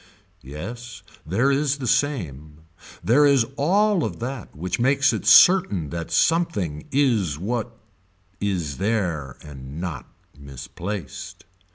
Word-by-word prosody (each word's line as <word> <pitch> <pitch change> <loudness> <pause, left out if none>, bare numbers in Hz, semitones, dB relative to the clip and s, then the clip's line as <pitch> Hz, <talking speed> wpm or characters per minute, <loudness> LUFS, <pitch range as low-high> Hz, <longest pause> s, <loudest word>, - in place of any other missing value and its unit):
Yes 115 - -8 0.2
there 115 - +2
is 140 +1 +1
the 135 - -6
same. 85 - -2 0.4
There 130 +7 +4
is 140 -5 +4
all 195 +5 +2
of 90 -6 -4
that 125 -1 -6
which 90 +6 -3
makes 135 +3 +3
it - - -4
certain 175 - +5
that 85 -1 -5
something 105 - 0
is 115 - +1
what 115 +5 -4 0.6
is 90 -8 -2
there 90 - -2
and 70 0 -9
not 85 -6 -5 0.3
misplaced. 70 +6 -8
105 Hz, 115 wpm, -23 LUFS, -, 0.6 s, certain